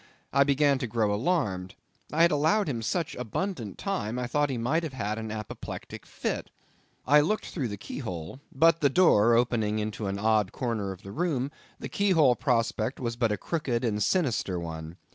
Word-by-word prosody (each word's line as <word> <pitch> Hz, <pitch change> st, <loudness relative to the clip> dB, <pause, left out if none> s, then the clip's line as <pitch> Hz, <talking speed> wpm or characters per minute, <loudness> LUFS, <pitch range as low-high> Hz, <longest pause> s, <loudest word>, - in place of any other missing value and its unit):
I 140 Hz, +1 st, +6 dB
began 140 Hz, 0 st, +3 dB
to 125 Hz, -, -2 dB
grow 110 Hz, -2 st, +1 dB
alarmed. 105 Hz, -, -1 dB, 0.4 s
I 160 Hz, +2 st, +3 dB
had 170 Hz, -, +5 dB
allowed 160 Hz, +8 st, +2 dB
him 120 Hz, -6 st, -2 dB
such 165 Hz, +8 st, -1 dB
abundant 125 Hz, -, -3 dB
time; 125 Hz, -, -2 dB
I 125 Hz, -, -1 dB
thought 145 Hz, +4 st, +1 dB
he 130 Hz, -, -2 dB
might 135 Hz, +8 st, +1 dB
have 160 Hz, -5 st, -5 dB
had 110 Hz, -3 st, -2 dB
an 110 Hz, 0 st, -5 dB
apoplectic 110 Hz, -2 st, -7 dB
fit. -, -, -3 dB, 0.6 s
I 150 Hz, +1 st, +6 dB
looked 210 Hz, +8 st, 0 dB
through 140 Hz, -8 st, -3 dB
the 100 Hz, -2 st, -5 dB
key 100 Hz, -, -7 dB
hole; 90 Hz, -, -6 dB
but 165 Hz, +4 st, +4 dB
the 140 Hz, -, +5 dB
door 120 Hz, -, +5 dB
opening 115 Hz, -3 st, +1 dB
into 105 Hz, -1 st, -3 dB
an 100 Hz, 0 st, -2 dB
odd 105 Hz, -2 st, +2 dB
corner 110 Hz, -6 st, -2 dB
of 95 Hz, 0 st, -10 dB
the 100 Hz, -, -8 dB
room, 145 Hz, -, -1 dB, 0.3 s
the -, -, -5 dB
key 200 Hz, 0 st, 0 dB
hole 145 Hz, -7 st, +5 dB
prospect 115 Hz, -1 st, 0 dB
was 115 Hz, -2 st, -2 dB
but 115 Hz, -2 st, +1 dB
a 105 Hz, -, 0 dB
crooked 130 Hz, -, -2 dB
and 105 Hz, -2 st, 0 dB
sinister 115 Hz, -, +1 dB
one. 80 Hz, 0 st, -7 dB
120 Hz, 195 wpm, -28 LUFS, 105-150 Hz, 0.6 s, I